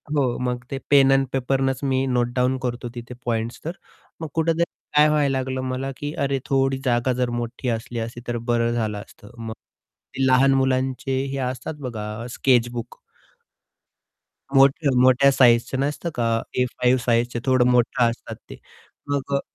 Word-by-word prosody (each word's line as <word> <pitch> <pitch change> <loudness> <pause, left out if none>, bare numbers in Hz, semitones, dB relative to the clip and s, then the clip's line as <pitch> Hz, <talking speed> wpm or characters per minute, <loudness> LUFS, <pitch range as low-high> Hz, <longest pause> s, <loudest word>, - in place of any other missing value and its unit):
हो. 130 -4 +1
मग 125 0 -2
ते 135 - -2
पेन 135 -1 +6
एंड 135 0 +4
पेपरनेच 135 0 0
मी 135 -1 +1
नोटडाउन 125 +1 +1
करतो 120 -1 -3
तिथे 120 +1 -8
पॉइंट्स 115 0 -2
तर. 165 - -2 0.5
मग 160 - -3
कुठेतरी 165 +1 +1 0.3
काय 150 +1 +7
व्हायला 150 -2 +2
लागलं? 130 0 -3
मला, 130 +1 -3
की 145 +1 -5
अरे, 135 0 0
थोडी 135 0 +1
जागा 120 +1 +1
जर 125 0 -1
मोठी 120 +2 -4
असली 115 +1 -3
असती 115 +1 -5
तर 120 0 -1
बरं 115 0 +2
झालं 110 -3 -1
असतं. 105 +1 -16
मग 115 -1 -6 0.6
ते 135 - +1
लहान 135 +1 +5
मुलांचे 130 0 0
हे 140 - -3
असतात 130 +4 -6
बघा 105 -3 -5
अ, - - -6
स्केच 120 -3 +3
बुक 120 -1 -6 1.6
मोठ्या-मोठ्या 135 -1 +5
साइझचं 125 0 +3
नसतं 145 +5 -2
का? 115 -1 +1
ए 125 - +2
5 125 +1 +1
साइझचे 120 0 +1
थोडं 130 -2 +3
मोठं 125 +1 +2
असतात 115 - -7
ते. - - -8 0.5
मग 140 -1 -2
अ, - - +2
130 Hz, 165 wpm, -23 LUFS, 120-135 Hz, 1.6 s, काय